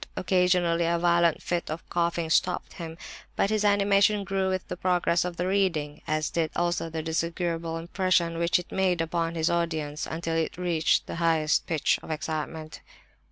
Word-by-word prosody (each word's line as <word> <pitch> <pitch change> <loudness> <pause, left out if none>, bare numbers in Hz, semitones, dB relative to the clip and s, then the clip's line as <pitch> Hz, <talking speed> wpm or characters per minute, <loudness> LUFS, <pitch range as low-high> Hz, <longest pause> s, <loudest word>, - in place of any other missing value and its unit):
Occasionally 180 -2 +2
a 170 0 +2
violent 170 -1 +2
fit 175 -1 -2
of 155 +2 -6
coughing 170 -1 -1
stopped 180 +2 +1
him, 165 -1 -7 0.4
but 200 - +1
his 215 -1 +1
animation 205 0 +3
grew 195 -1 -1
with 185 0 -2
the - - -4
progress 175 -1 +1
of 175 -1 -5
the 180 - -1
reading—as 155 -5 -1
did 165 -2 0
also 175 -1 0
the 160 0 -4
disagreeable 165 0 -2
impression 170 -1 0
which 170 0 +3
it 180 - -7
made 185 -2 +1
upon 165 0 -1
his 160 0 +1
audience,—until 165 -1 -2
it 165 0 -1
reached 170 -3 +1
the - - -6
highest 160 -2 +2
pitch 160 -4 +1
of - - -12
excitement. 155 0 -4
170 Hz, 160 wpm, -27 LUFS, 160-180 Hz, 0.4 s, animation